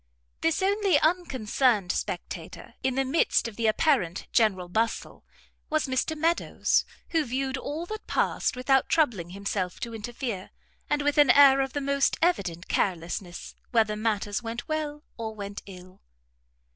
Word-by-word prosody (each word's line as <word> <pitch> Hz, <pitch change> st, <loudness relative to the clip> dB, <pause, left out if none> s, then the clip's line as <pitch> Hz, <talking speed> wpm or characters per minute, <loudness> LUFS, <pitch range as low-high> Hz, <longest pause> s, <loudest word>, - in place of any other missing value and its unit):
This 330 Hz, +3 st, +1 dB
only 395 Hz, -5 st, +3 dB
unconcerned 260 Hz, -, +1 dB
spectator -, -, -5 dB
in 260 Hz, -1 st, 0 dB
the 270 Hz, 0 st, +1 dB
midst 270 Hz, -2 st, +2 dB
of 225 Hz, -, -8 dB
the 230 Hz, 0 st, 0 dB
apparent 215 Hz, -, +1 dB
general 195 Hz, -6 st, +2 dB
bustle, 225 Hz, +5 st, -2 dB, 0.5 s
was 310 Hz, 0 st, +1 dB
Mr 265 Hz, +4 st, -1 dB
Meadows; 330 Hz, +3 st, +1 dB, 0.2 s
who 325 Hz, -2 st, +2 dB
viewed 265 Hz, +1 st, -2 dB
all 300 Hz, +5 st, -4 dB
that 435 Hz, +4 st, -7 dB
passed -, -, 0 dB
without 255 Hz, +1 st, +2 dB
troubling 230 Hz, -, +1 dB
himself 190 Hz, -1 st, -3 dB
to 235 Hz, -, -4 dB
interfere, 225 Hz, -2 st, -5 dB, 0.4 s
and 295 Hz, -1 st, +1 dB
with 290 Hz, +1 st, +2 dB
an 290 Hz, -3 st, +6 dB
air 275 Hz, +1 st, +7 dB
of 270 Hz, -1 st, -2 dB
the 285 Hz, -, -2 dB
most 280 Hz, 0 st, +1 dB
evident 190 Hz, -, 0 dB
carelessness 175 Hz, -1 st, -2 dB, 0.2 s
whether 220 Hz, -3 st, +2 dB
matters 210 Hz, -1 st, -1 dB
went 230 Hz, +1 st, -5 dB
well 300 Hz, -1 st, -3 dB
or 220 Hz, -1 st, -5 dB
went 200 Hz, -1 st, -6 dB
ill. 185 Hz, -1 st, -12 dB
250 Hz, 145 wpm, -27 LUFS, 205-295 Hz, 0.5 s, air